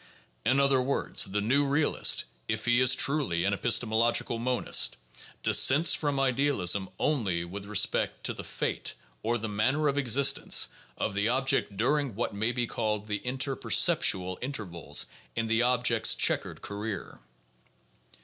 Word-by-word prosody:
In 130 +5 +2
other 140 -1 +3
words, 135 +2 0
the 105 +1 -2
new 130 +7 +2
realist 145 +2 +1 0.2
(if - - -3
he 120 +1 +3
is 130 0 +5
truly 135 - +1
an 100 - +1
epistemological 115 +1 +1
monist) 125 +1 +1 0.5
dissents 150 +6 +4
from 145 -3 -1
idealism 130 -9 +1
only 100 - -1
with 100 +3 -8
respect 105 -2 0
to - - -1
the - - -8
fate, - - -3 0.3
or 120 +2 -1
the 110 -1 -5
manner 130 +9 0
of 140 0 0
existence, 135 +1 +2 0.3
of - - -2
the 100 +2 0
object 130 -5 0
during 140 +1 0
what 115 0 -2
may 110 +4 0
be 125 -1 0
called 105 -2 -3
the 105 -1 -3
interperceptual 125 -8 +1
intervals 105 - -3 0.3
in 115 - -1
the 115 +1 +1
object's 120 -2 +2
checkered - - -1
career. 105 +1 -6
120 Hz, 140 wpm, -28 LUFS, 105-135 Hz, 0.5 s, is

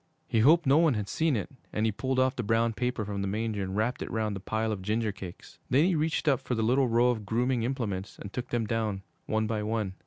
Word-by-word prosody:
He 115 - +1
hoped 155 +9 +5
no 140 +3 +5
one 160 -6 +4
had 105 -2 -2
seen 160 +2 +1
it, 110 - -3 0.2
and 105 - 0
he 110 - +2
pulled 130 +5 -2
off 130 0 +3
the - - -2
brown 115 +1 +1
paper 125 -2 -2
from 100 -1 -3
the 100 - -1
manger 105 +1 -2
and 95 0 -3
wrapped 115 +4 0
it - - -4
round 110 -2 -1
the - - -4
pile 110 +3 -1
of 105 -3 -3
ginger 110 +2 0
cakes. 95 -3 -10
Then 135 +6 +4
he 185 - +2
reached 155 0 0
up 135 -4 +4
for 125 - -2
the 110 - 0
little 130 +4 +3
row 120 +1 +4
of 110 -3 -3
grooming 120 +4 0
implements 115 -6 -3
and 100 - -9
took 125 0 -4
them 120 -2 0
down 105 -3 -1 0.2
one 110 0 +1
by 110 -1 -1
one. 105 -2 -1
115 Hz, 260 wpm, -29 LUFS, 105-125 Hz, 0.2 s, hoped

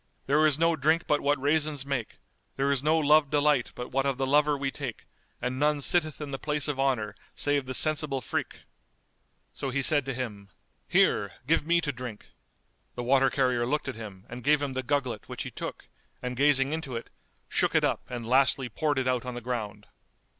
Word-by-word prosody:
There 150 +3 +4
is 145 -2 +2
no 165 +1 +3
drink 160 +4 +2
but 150 - +1
what 145 0 +1
raisins 145 0 0
make, 140 -5 -3 0.4
there 140 +1 +1
is 140 -2 +1
no 155 +3 +3
love 150 -1 +4
delight 145 -3 +2
but 125 - -6
what 135 +1 +1
of 135 -2 0
the 135 - 0
lover 145 +2 +3
we 135 -1 -2
take 135 -6 -6 0.3
and 125 +1 -3
none 150 0 +2
sitteth 155 +1 +1
in 150 -2 -6
the 135 - -4
place 150 -1 -1
of 145 -2 -2
honour 125 -6 0 0.2
save 145 -2 0
the 130 - -1
sensible 155 -3 +2
freke[FN#216]!" - - -4 0.9
So 135 - -4
he 135 +1 -1
said 145 0 +3
to 135 -2 -3
him, 105 -6 -6 0.4
"Here, 100 -1 +2
give 155 +1 +2
me 170 0 +4
to 150 - -1
drink!" 125 -4 -8 0.7
The 120 - -4
water 135 +2 +4
carrier 125 -3 +1
looked 150 +3 -1
at 135 - -2
him 105 -4 -10
and 120 +1 -8
gave 150 +1 +4
him 140 -2 -3
the 130 - -2
gugglet 125 -4 -2
which - - -4
he - - -7
took - - -7 0.3
and 125 0 -4
gazing 140 +1 +3
into 160 -6 -4
it, 115 - -6 0.4
shook - - 0
it - - +4
up - - +1
and 120 -2 -5
lastly 130 0 +3
poured 145 +5 0
it 130 -1 0
out 125 -2 +1
on 125 -1 -6
the - - -4
ground. 110 -4 -4
135 Hz, 210 wpm, -28 LUFS, 125-150 Hz, 0.9 s, There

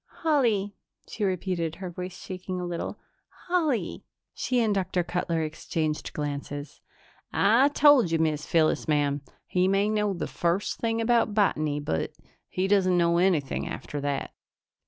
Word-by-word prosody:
"Holly," 230 -11 +2 0.3
she 215 - -5
repeated, 180 -3 -1
her 185 -1 -6
voice 180 +1 -6
shaking 185 0 -5
a 180 - -3
little. 175 -1 -4 0.5
"Holly." 325 -9 0 0.3
She 250 -1 0
and 220 -3 +2
Dr. 185 -2 0
Cutler 170 -2 -1
exchanged 155 0 -3
glances. 145 -1 -5 0.5
"I 230 +7 +5
told 290 - +5
you, 165 - +1
Miz 155 -2 0
Phyllis, 160 -2 +2
ma'am 145 -2 +1 0.2
he 180 0 +1
may 195 +2 +2
know 210 -2 +1
the 170 - -3
first 175 +4 -1
thing 230 0 0
about 230 -2 +2
botany, 155 -8 +2
but 80 - -2 0.4
he 185 +1 -1
doesn't 190 -3 +3
know 170 0 +3
anything 170 -7 +1
after 145 - -5
that." 140 -1 -2
180 Hz, 145 wpm, -27 LUFS, 160-210 Hz, 0.5 s, I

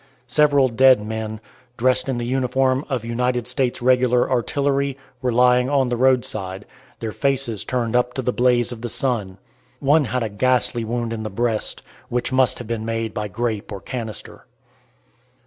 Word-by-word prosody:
Several 145 +1 +4
dead 130 0 +5
men, 110 0 -4 0.4
dressed 130 +2 +1
in 130 - -1
the 120 - -3
uniform 130 +1 +1
of 125 -5 -2
United 125 +1 -1
States 125 -1 -1
regular 125 -1 +3
artillery, 140 +2 0 0.2
were 125 -1 0
lying 125 +1 +4
on 135 -3 +2
the 120 - 0
roadside, 110 -6 0 0.3
their 110 -1 -4
faces 135 -5 -1
turned 120 -2 -1
up 125 0 +1
to 130 - -2
the 125 - 0
blaze 125 -1 +2
of 115 -2 -7
the 120 - -4
sun. 110 -7 -2 0.4
One 145 +2 +3
had 125 +1 -1
a 110 - -2
ghastly 120 +2 +1
wound 115 0 -2
in 110 - -4
the 110 - -4
breast, 115 +2 -2 0.3
which 125 +1 -1
must 130 -1 +3
have 120 - -7
been 115 -1 -3
made 115 -1 -3
by 105 -1 -3
grape 110 0 -3
or 100 - -5
canister. 115 -1 -7
125 Hz, 170 wpm, -22 LUFS, 115-130 Hz, 0.4 s, dead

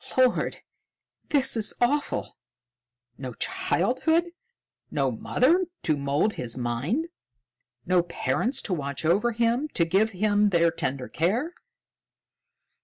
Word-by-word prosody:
"Lord! 255 -1 +2 0.7
This 270 -4 +2
is 220 -2 +1
awful. 285 +5 0 0.8
No 130 -3 -6
childhood; 320 - 0 0.6
no 135 -3 0
mother 305 - +2 0.2
to 155 - +2
mould 145 +9 0
his 120 -1 -3
mind! 135 - -2 0.8
No 180 0 +3
parents 230 +8 -1
to 190 - -2
watch 140 -2 -3
over 200 +9 +3
him, 235 +5 +1
to 170 - +3
give 195 +6 +2
him 205 +2 +2
their 170 -3 +3
tender 130 -5 -3
care!" 230 - -1
200 Hz, 110 wpm, -26 LUFS, 150-250 Hz, 0.8 s, No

